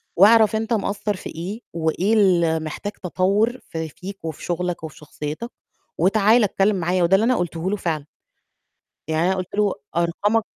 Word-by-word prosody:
وأعرف 220 +3 +6
أنت 225 +1 -1
مقصّر 205 0 -1
في - - -8
إيه 185 +8 -6
وإيه 170 +6 0
اللي 170 -6 +3
محتاج 160 +6 -5
تطوّر 200 +7 0
ف 165 - -7
فيك 180 +5 -6
وفي 160 -2 -6
شُغلك 175 -1 -2
وفي 160 -1 -8
شخصيتك 150 - -6 0.5
وتعال 215 +6 +4
اتكلِّم 200 +1 +2
معايا، 180 0 +1
وده 170 +3 +4
اللي 205 - +3
أنا 250 +2 +3
قلته 175 +1 -2
له - - +1
فعلًا. 155 -5 -2 1.0
يعني 160 +2 +1
أنا 190 - +2
قُلت 185 +1 -5
له: 205 -2 +2 0.2
"أرقامك" 205 +6 +1
185 Hz, 165 wpm, -22 LUFS, 170-210 Hz, 1.0 s, وأعرف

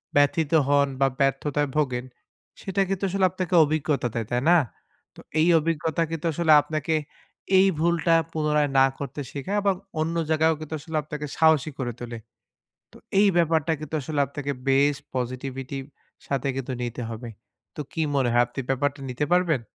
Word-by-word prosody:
ব্যথিত 145 +1 +3 0.2
হোন 140 0 +4
বা 135 - +5
ব্যর্থতায় 140 +1 +1
ভোগেন, 130 -4 0 0.6
সেটা 195 0 -1
কিন্তু 195 0 -2
আসলে 190 +1 +2
আপনাকে 185 -1 -4
অভিজ্ঞতা 150 -3 0
দেয়, 115 -2 -3
তাই 120 0 +1
না? 175 - +7 0.6
তো - - -15 0.2
এই 160 - +4
অভিজ্ঞতা 160 +1 -1
কিন্তু 165 0 -4
আসলে 165 0 +2
আপনাকে 155 +2 -2 0.6
এই 190 +1 +6
ভুলটা 165 0 +2 0.2
পুনরায় 150 -2 +1
না 135 - +7
করতে 140 +1 -5
শেখায় 170 +9 -3
আবার 200 -1 +2 0.3
অন্য 165 +2 -1
জায়গায়ও 160 0 +3
কিন্তু 155 0 -7
আসলে 160 +1 -4
আপনাকে 150 0 -6
সাহসী 160 -2 +4
করে 125 -2 -2
তোলে। 120 -1 -6 0.7
তো - - -15 0.2
এই 205 - +6
ব্যাপারটা 165 -2 +2
কিন্তু 155 0 -5
আসলে 145 +2 -3
আপনাকে 140 +1 -4 0.2
বেশ 140 +2 +4 0.2
পসিটিভিটি 130 +2 -4 0.5
সাথে 140 -1 -1
কিন্তু 135 -1 -4
নিতে 120 0 -4
হবে। 115 +1 -7 0.5
তো - - -4
কী 165 - -1
মনে 130 -3 +2
হয় 120 0 +5
আপনি 120 - -8
ব্যাপারটা 140 +2 0
নিতে 125 +4 -1
পারবেন? 175 -7 +3
150 Hz, 165 wpm, -25 LUFS, 135-160 Hz, 0.7 s, না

